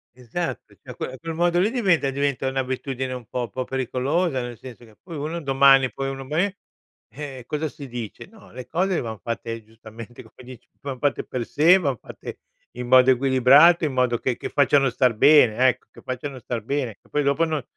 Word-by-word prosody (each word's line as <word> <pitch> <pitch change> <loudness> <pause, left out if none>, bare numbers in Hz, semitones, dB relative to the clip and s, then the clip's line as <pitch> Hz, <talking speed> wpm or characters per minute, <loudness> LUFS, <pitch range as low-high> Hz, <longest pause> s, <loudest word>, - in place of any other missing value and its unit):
Esat 130 +8 -4
cioé, - - -23 0.2
que 130 - -5
quel 165 0 -5
modo 175 +1 +1
lì 195 +4 +3
diventa 190 - +2
diventa 140 -1 -1
un'abitudine 130 0 -3
un 125 -2 -7
po' 120 0 -4
po' 130 - -4
pericolosa, 135 +4 -1
nel 120 -1 -7
senso 125 -1 -12
che, 110 -2 -20
poi, 170 -2 -10
uno 155 +4 -4
domani, 135 -2 +4
poi, 135 0 -4
uno 135 0 -6
me 180 +8 -1 0.5
eh, 135 -3 -8
cosa 150 +1 -2
si 140 0 -10
dice? 120 -4 -7
No, 220 0 -18
le 125 0 -9
cose 185 +2 0
van 110 -3 -6
fatte 115 -1 -5
giustamente 115 +2 -12
come - - -21 0.2
dici, 125 - -18
van 135 -2 -6
fatte 145 +1 0
per 125 -2 -5
sé 165 +9 +5
van 140 -8 -1
fatte - - -10 0.3
in 125 0 -6
modo 130 +1 +6
equilibrate, 135 +6 +5
in 145 - -2
modo 125 -2 +1
che 125 0 -2
che - - -6
facciano 140 -1 +3
star 125 -1 +1
bene, 125 -3 +5
ecco, 130 0 -1
che - - -16
facciano 130 +1 -5
star 120 -1 -4
bene, 125 -4 -3
che - - -27
poi 150 - 0
dopo 140 +4 +2
non 155 -4 -3
135 Hz, 200 wpm, -23 LUFS, 125-150 Hz, 0.5 s, modo